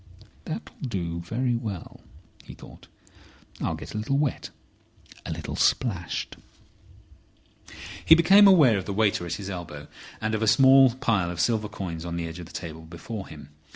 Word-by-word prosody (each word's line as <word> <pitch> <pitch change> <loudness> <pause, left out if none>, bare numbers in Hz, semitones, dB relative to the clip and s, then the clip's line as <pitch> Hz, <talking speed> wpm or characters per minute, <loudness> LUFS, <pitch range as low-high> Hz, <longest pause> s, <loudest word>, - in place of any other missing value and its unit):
"That'll - - -7
do 85 -9 -3
very 120 +8 -2
well," 105 -7 -6 0.4
he - - -12
thought. - - -15 0.7
"I'll - - -1
get - - -9
a 110 - -3
little 135 +6 -1
wet, 145 -3 -1 0.8
a - - -4
little - - -5
splashed—" 95 -10 -1 1.7
He 160 - +8
became 195 +5 +7
aware 145 - +6
of 95 - -7
the 100 - -4
waiter 105 -3 +1
at 85 - -3
his 100 +1 -5
elbow 75 -5 -8 0.3
and 110 0 -2
of 110 - -1
a 110 - +1
small 130 +2 +6
pile 110 -9 0
of 90 -1 -6
silver 110 +2 0
coins 85 -4 -6
on 85 -1 -5
the 85 -1 -3
edge 80 +2 -8
of 85 - -9
the - - -15
table 80 -1 -7
before 90 +6 -8
him. 75 -2 -12
100 Hz, 170 wpm, -25 LUFS, 85-120 Hz, 1.7 s, He